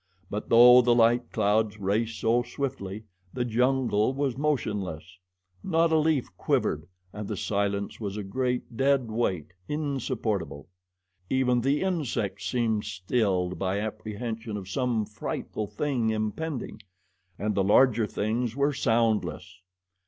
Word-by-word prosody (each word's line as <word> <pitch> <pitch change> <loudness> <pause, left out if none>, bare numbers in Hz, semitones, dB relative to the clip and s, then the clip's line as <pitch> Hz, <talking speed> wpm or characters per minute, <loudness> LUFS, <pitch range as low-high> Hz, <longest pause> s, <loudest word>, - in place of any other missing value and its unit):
But 105 - -4
though 125 +2 +9
the 120 -1 +3
light 120 +1 +3
clouds 105 +1 +1
raced 110 +3 -1
so 115 +2 +3
swiftly, 120 -5 -5 0.3
the 125 -1 0
jungle 125 -1 +1
was 140 -3 -1
motionless. 100 - -2 0.4
Not 165 -2 +2
a 160 - +4
leaf 150 - 0
quivered - - 0 0.3
and 105 -1 -6
the 105 - -4
silence 100 0 -1
was 105 -2 -4
a 105 - -3
great, 125 +3 -2
dead 135 -2 +2
weight 95 -8 -1
insupportable. 120 - -2 0.6
Even 125 -2 +2
the 140 +4 +1
insects 120 - -2
seemed 115 -4 0
stilled 95 -2 -1
by 95 +1 0
apprehension 110 +1 -5
of 95 -3 -7
some 115 +1 0
frightful 105 0 -5
thing 120 +2 -1
impending, 110 +4 -3 0.6
and 105 +1 -1
the 95 - +1
larger 110 +2 +4
things 115 +3 -2
were 140 +1 +1
soundless. 110 -7 0
115 Hz, 130 wpm, -27 LUFS, 105-125 Hz, 0.6 s, though